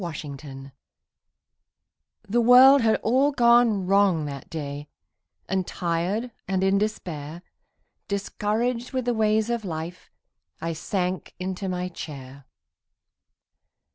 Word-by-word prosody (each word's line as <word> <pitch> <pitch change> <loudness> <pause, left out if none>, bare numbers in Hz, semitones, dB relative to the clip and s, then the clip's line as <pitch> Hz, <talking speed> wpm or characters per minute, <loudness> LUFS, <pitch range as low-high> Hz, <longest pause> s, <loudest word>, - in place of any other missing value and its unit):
MY 170 -2 -4
COMFORTER 140 -2 -9 1.5
The 235 +4 +2
world 255 +3 +8
had 220 -1 +2
all 265 +6 +3
gone 235 -6 +4
wrong 195 -5 +3
that 140 -2 -7
day 145 -2 -6 0.6
And 190 -1 -1
tired 180 +8 -2 0.2
and 190 -1 0
in 195 +1 +3
despair, 170 -6 -4 0.6
Discouraged 225 +5 -2
with 255 -2 -1
the 245 - +1
ways 220 0 +1
of 235 -2 -2
life, 170 0 -6 0.5
I 165 +1 -3
sank 180 +3 -3
into 190 +1 -4
my 180 0 -2
chair. 140 -6 -9
190 Hz, 110 wpm, -25 LUFS, 160-225 Hz, 1.5 s, world